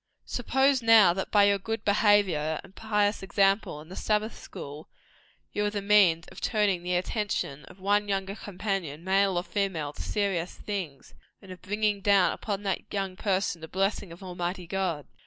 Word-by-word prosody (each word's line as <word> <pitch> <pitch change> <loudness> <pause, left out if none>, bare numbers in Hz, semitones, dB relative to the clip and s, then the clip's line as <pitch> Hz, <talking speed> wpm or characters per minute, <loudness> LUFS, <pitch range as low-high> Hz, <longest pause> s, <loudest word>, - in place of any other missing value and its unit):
Suppose 265 +2 +1
now 225 -6 +7
that 190 +1 -4
by 205 -1 +5
your 200 0 +4
good 225 +2 -4
behaviour 200 -7 +3
and 195 0 -17
pious 210 -1 0
example 195 -4 +1
in 155 - -15
the 185 - -8
Sabbath 215 +1 0
school, 145 +2 -9 0.6
you 210 - 0
are 205 - +1
the 205 0 -3
means 195 -5 +4
of - - -12
turning 205 -5 +1
the 180 +1 -1
attention 180 - -2
of 190 - -15
one 205 +2 +1
younger 195 0 -1
companion, 185 -7 -4
male 190 0 +2
or 175 - 0
female, 185 -8 -2
to - - -9
serious 195 -4 -1
things, 175 -10 -6 0.3
and 195 - -13
of 185 - -10
bringing 210 0 0
down 200 -2 +4
upon 205 -2 -4
that 195 -2 -3
young 195 -2 -2
person 190 -4 -1
the 160 - -7
blessing 195 0 -1
of 170 +3 -11
Almighty 180 0 -4
God. 170 -5 -2
195 Hz, 175 wpm, -28 LUFS, 180-205 Hz, 0.6 s, now